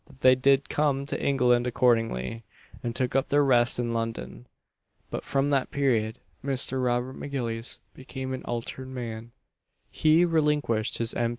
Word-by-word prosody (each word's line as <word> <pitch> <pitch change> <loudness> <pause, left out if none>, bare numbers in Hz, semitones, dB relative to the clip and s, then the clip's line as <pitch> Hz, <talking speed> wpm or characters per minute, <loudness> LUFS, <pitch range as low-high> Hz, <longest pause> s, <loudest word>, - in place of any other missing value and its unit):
That 130 - -19
they 130 - +7
did 135 +2 +3
come 140 -2 0
to - - -4
England 125 -3 +3
accordingly, 115 - +1 0.4
and 120 -1 -4
took 125 0 -1
up 135 - +2
their 145 +1 +3
rest 120 -3 +4
in 120 -1 -1
London; 65 - -4 0.6
but - - -4
from 140 +1 0
that 135 -2 +1
period 115 -6 0 0.3
Mr. 130 -1 -1
Robert 125 +1 0
M'Gillies 120 -5 -4 0.2
became 130 0 -6
an 130 - -4
altered 120 +2 -5
man; 120 -3 -6 0.6
he 160 +3 +4
relinquished 150 -9 +1
his 115 -1 0
M. 120 -1 0
125 Hz, 155 wpm, -27 LUFS, 115-135 Hz, 0.6 s, they